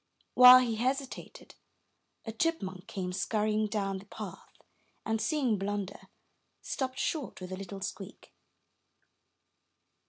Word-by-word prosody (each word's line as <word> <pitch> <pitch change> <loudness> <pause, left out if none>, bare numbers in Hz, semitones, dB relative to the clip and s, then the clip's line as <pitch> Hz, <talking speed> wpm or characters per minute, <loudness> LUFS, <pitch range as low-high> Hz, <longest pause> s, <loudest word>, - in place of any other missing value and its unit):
While 250 0 +10
he 230 -3 -1
hesitated, 260 +3 -4 0.7
a 225 - -4
chipmunk 210 - -2
came 185 -5 -4
scurrying 215 +2 0
down 195 -2 -2
the 200 - -15
path, - - -9 0.6
and, 225 0 -1
seeing 260 -10 +1
Blunder, 200 0 -4 0.5
stopped 260 -1 -4
short 300 -6 -3
with 185 0 -8
a - - -3
little 195 +1 -8
squeak. 195 0 -8
215 Hz, 115 wpm, -30 LUFS, 195-250 Hz, 0.7 s, While